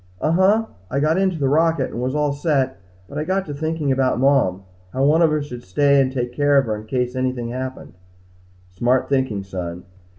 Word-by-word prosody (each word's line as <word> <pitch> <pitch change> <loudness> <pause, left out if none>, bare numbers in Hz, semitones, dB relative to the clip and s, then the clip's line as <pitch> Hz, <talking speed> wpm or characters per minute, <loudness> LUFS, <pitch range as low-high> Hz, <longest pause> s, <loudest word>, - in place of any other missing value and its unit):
"Uh 155 - 0
huh. 195 +6 +3 0.2
I 135 - -1
got 155 +5 +2
into 190 -3 +1
the 140 -3 0
rocket 160 -1 +2
and 120 - -5
was 130 +3 -2
all 150 -1 +1
set 140 - 0 0.3
but 145 - -6
I - - -1
got 190 +3 -1
to 145 - -6
thinking 155 -1 -2
about 130 -2 +1
Mom 130 -9 +2 0.3
how 135 +1 +1
one 155 +4 +4
of 160 -2 +4
us 150 -1 -1
should 125 -4 -8
stay 140 +9 +3
and 130 -1 0
take 125 -2 -3
care 145 +2 +3
of 135 - +4
her 110 -2 -2
in 105 +1 -9
case 125 +1 -1
anything 130 -2 -2
happened." 130 +1 -6 0.8
"Smart 120 +7 +1
thinking, 130 -8 0
son. 90 -2 -6
135 Hz, 210 wpm, -21 LUFS, 125-150 Hz, 0.8 s, one